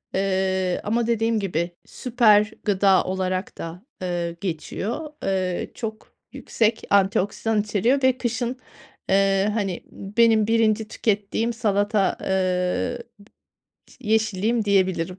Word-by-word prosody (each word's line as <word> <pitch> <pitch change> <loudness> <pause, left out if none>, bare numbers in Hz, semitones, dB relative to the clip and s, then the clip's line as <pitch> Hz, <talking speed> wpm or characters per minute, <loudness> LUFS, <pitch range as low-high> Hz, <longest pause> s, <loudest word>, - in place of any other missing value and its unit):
Eee, 190 -1 0
ama 230 +2 0
dediğim 225 -1 +1
gibi 175 -3 -2
süper 220 -4 +3
gıda 195 -2 +3
olarak 185 0 -3
da, 170 +6 -8 0.2
eee, 175 -2 -2
geçiyor. 205 - -4
Eee, 185 -2 -1
çok 220 -2 -7 0.2
yüksek 225 0 0
antioksidan 200 +2 +2
içeriyor 225 +6 +1
ve 260 -1 +4
kışın, 245 +1 -2 0.5
eee, 195 +1 +3
hani, 195 -5 -2
benim 220 +1 +2
1'inci 220 -1 +2
tükettiğim 220 +2 -1
salata, 205 -2 +1
eee, 185 +6 -1 0.2
bı 200 - -16 0.8
yeşilliğim 220 0 +1
diyebilirim. 185 -2 +1
205 Hz, 105 wpm, -23 LUFS, 190-225 Hz, 0.8 s, ve